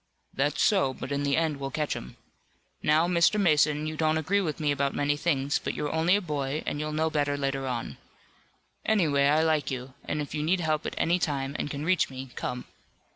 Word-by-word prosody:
"That's 145 +2 +1
so, 135 -11 +3
but - - -7
in 140 0 0
the 140 -1 +1
end 160 -3 +1
we'll 135 0 -4
catch 150 +1 -2
'em. 65 - -8 0.6
Now, 155 +3 +3
Mr. 175 +4 +3
Mason, 150 -4 +3
you 155 0 -3
don't 155 0 +1
agree 190 +6 +1
with 160 -5 -3
me 150 -2 +1
about 140 -1 0
many 145 0 +1
things, 145 -3 0
but - - -4
you're 150 0 -2
only 165 +4 +3
a 205 - +1
boy 150 -3 -2
and 145 - -2
you'll 155 0 -2
know 160 +1 0
better 145 -1 0
later 135 -1 -2
on. 115 - -4 0.9
Anyway, 155 -10 +2
I 155 +2 +4
like 155 -4 +1
you, 130 0 -5
and 150 - -3
if 145 - -4
you 150 - -2
need 175 +5 +1
help 155 -1 0
at - - -5
any 175 +2 +2
time 140 -4 -2
and - - -2
can 145 +1 -4
reach 185 0 +2
me, 130 -1 -8
come." 125 0 -4
150 Hz, 220 wpm, -27 LUFS, 140-160 Hz, 0.9 s, I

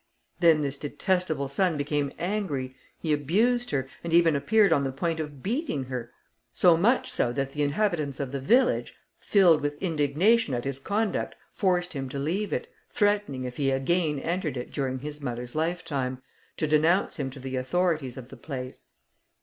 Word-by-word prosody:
Then 165 -3 +5
this 140 0 -2
detestable 155 -2 -1
son 160 +4 +1
became 145 -1 -1
angry, 170 -10 -2 0.2
he 155 -2 -1
abused 220 - +2
her, 135 -2 -1 0.2
and 170 - -4
even 165 -2 +5
appeared 205 +9 +4
on 140 - +2
the 135 - -1
point 160 +4 -2
of 150 -4 -6
beating 230 - -1
her, 125 -2 -5 0.4
so 175 +7 +5
much 215 +10 +2
so 120 - +1
that 135 0 -2
the 150 - -3
inhabitants 150 -2 0
of 135 -3 -3
the 140 - -3
village, 240 - +2 0.2
filled 180 -6 +4
with 145 0 -3
indignation 165 - +2
at 120 - -3
his 135 -1 -3
conduct, 205 +7 -1 0.2
forced 180 -2 +1
him 135 -3 -4
to 140 - -5
leave 175 +9 -1
it, 480 - -1 0.2
threatening 205 - +1
if 125 -1 -6
he 140 -2 +1
again 150 +3 +1
entered 165 -1 -2
it 125 - -6
during 130 -2 -1
his 150 +2 -7
mother's 120 -2 -4
lifetime, 155 -6 -2 0.4
to - - 0
denounce 155 +6 +2
him 140 -4 -2
to 135 +1 -10
the 130 0 -5
authorities 150 0 0
of 130 -1 -9
the - - -11
place. 130 -4 -7
150 Hz, 175 wpm, -27 LUFS, 135-180 Hz, 0.4 s, Then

